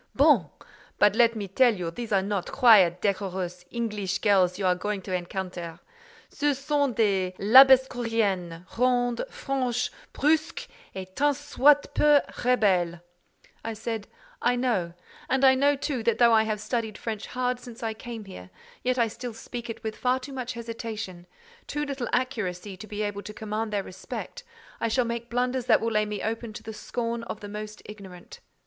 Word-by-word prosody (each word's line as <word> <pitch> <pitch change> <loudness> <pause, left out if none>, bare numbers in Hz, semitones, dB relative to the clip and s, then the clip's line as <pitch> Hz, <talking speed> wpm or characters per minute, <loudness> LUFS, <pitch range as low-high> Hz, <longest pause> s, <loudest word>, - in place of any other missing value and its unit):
"Bon! 270 - +4 0.5
But 205 -1 +5
let 235 -1 +4
me 205 -2 -4
tell 235 +4 +4
you 175 -3 -4
these 235 +5 -7
are 195 -2 +3
not 200 -2 -2
quiet, 215 -10 +5
decorous, 185 -3 -2
English 210 -5 -2
girls 190 -3 +3
you 195 - -2
are 180 - +4
going 200 +2 -3
to 185 - -5
encounter. 180 -2 -4 0.5
Ce 290 -2 0
sont 285 -2 0
des 190 -4 +1
Labassecouriennes, 225 -7 +4
rondes, 245 -1 +2
franches, 255 -3 -2 0.2
brusques, 310 +3 0 0.3
et 185 0 -8
tant 290 0 +2
soit 290 0 +3
peu 295 -1 +5 0.2
rebelles." 190 -9 +2 0.6
I 225 - -3
said: 220 -1 -5 0.3
"I 245 - +2
know; 225 -9 0 0.4
and 265 +1 +3
I 265 - +8
know, 285 +2 +3
too, 275 -2 -3
that 225 0 +1
though 235 -1 +5
I 220 0 +5
have 215 -1 -2
studied 220 -2 -3
French 220 -2 -5
hard 250 0 -1
since 240 0 -11
I 225 -1 -1
came 225 -1 -8
here, 90 - -11 0.3
yet 255 0 0
I 235 -2 +3
still 235 +1 -7
speak 235 +1 -7
it 230 - -7
with 220 -1 -4
far 255 +1 +1
too 265 +2 -9
much 255 -2 -4
hesitation—too 230 - -7
little 275 -4 -4
accuracy 205 -7 -2
to 215 +4 -10
be 210 0 -3
able 205 -1 -3
to 210 +1 -9
command 215 +1 -3
their 205 -2 -1
respect 190 - -7 0.4
I - - 0
shall 245 +2 +1
make 235 0 -4
blunders 250 +1 -1
that 220 - +5
will 230 - -1
lay 215 -1 +2
me 210 -1 -4
open 225 0 -3
to - - -9
the 220 - -7
scorn 230 +2 -3
of 220 -2 -6
the 205 - -7
most 210 +1 -7
ignorant. 200 - -11
225 Hz, 175 wpm, -26 LUFS, 200-250 Hz, 0.6 s, I